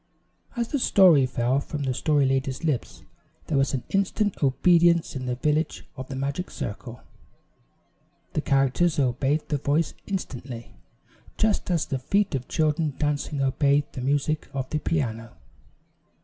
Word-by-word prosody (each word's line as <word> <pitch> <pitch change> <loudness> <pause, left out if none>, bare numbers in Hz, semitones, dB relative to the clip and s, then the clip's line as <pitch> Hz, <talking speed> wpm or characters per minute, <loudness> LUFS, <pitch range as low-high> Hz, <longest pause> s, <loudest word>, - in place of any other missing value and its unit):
As 235 -1 -2
the 285 - -1
story 175 - +5
fell 125 +1 +1
from 145 +1 -5
the 130 -1 0
Story 145 +2 +2
Lady's 135 +2 -1
lips 150 -7 -2 0.4
there 150 - 0
was 135 0 +1 0.2
instant 200 +1 0
obedience 170 +4 +3
in 130 -1 -4
the 125 - -1
village 150 +4 -1
of 130 -1 -7
the 135 - -6
magic 140 +7 -3
circle. 115 +4 -6 1.3
The - - 0
characters 135 +5 +2
obeyed 135 +3 +1
the 145 - 0
voice 145 +3 0
instantly, 130 - -5 0.6
just 215 -3 +1
as 170 -3 +1
the 135 - -3
feet 200 +9 +1
of 130 -2 -3
children 155 -2 0
dancing 145 -1 -1
obey 140 +2 +2
the 130 - -6
music 145 +3 0
of 130 -1 -2
the 155 - 0
piano. 115 -8 -2
145 Hz, 145 wpm, -25 LUFS, 130-165 Hz, 1.3 s, story